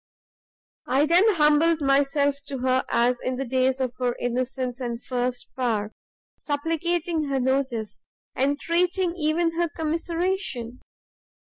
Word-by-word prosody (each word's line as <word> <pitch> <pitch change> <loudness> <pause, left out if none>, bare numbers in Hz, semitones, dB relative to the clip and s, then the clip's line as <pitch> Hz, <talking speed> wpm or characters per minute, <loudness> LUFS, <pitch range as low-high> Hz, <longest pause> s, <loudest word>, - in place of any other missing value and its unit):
I 270 +4 +3
then 370 +6 +4
humbled 310 +1 +4
myself 280 0 +2
to 280 -1 -4
her 255 +1 +1
as 245 +1 +2
in 255 - -1
the 270 +2 -3
days 260 +1 +1
of 255 -2 -1
her 245 -1 0
innocence 250 +1 -2
and 240 -2 -3
first 250 -1 -2
power, 220 -5 -1 0.5
supplicating 325 +2 -1
her 275 -1 -1
notice, 260 -4 -1 0.3
entreating 335 +6 +1
even 330 +1 +1
her 345 -1 +1
commiseration! 330 - -2
275 Hz, 120 wpm, -25 LUFS, 255-330 Hz, 0.5 s, then